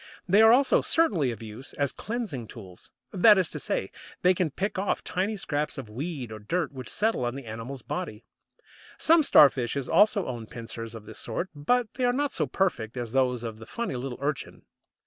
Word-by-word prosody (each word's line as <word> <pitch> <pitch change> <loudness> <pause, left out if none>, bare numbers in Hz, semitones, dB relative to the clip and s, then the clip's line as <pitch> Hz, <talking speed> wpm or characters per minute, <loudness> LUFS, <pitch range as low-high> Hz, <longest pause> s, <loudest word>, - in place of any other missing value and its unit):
They 200 +4 +5
are 220 0 +8
also 265 +3 +5
certainly 195 - +2
of 115 -2 -6
use 110 +5 -8
as 140 -2 0
cleansing 210 - -4
tools. 95 -7 -12 0.2
That 210 +2 +7
is 185 -3 +1
to 150 - -5
say, 95 - -2 0.3
they 180 +1 +6
can 180 -2 0
pick 190 +6 -3
off 200 - -1
tiny 200 +4 -1
scraps 150 -4 -2
of 120 -6 -7
weed 135 -1 -5
or 110 - -7
dirt 165 - -2
which 130 -3 -8
settle 220 - 0
on 120 +1 -2
the 135 -2 -7
animal's 115 +4 -7
body. 150 -12 -5 0.7
Some 330 +1 +5
Starfishes 140 - +4
also 210 -2 +4
own 120 -3 -5
pincers 115 0 -7
of 110 -2 -10
this - - -8
sort, 145 +11 -3
but 220 +11 0
they 255 - -1
are 245 - +3
not 285 +2 0
so - - 0
perfect 125 - -1
as 120 -2 -4
those 125 -2 +1
of 110 -2 -6
the 110 - -11
funny 235 - -3
little 125 0 -5
Urchin. 140 0 -4
140 Hz, 200 wpm, -27 LUFS, 120-195 Hz, 0.7 s, are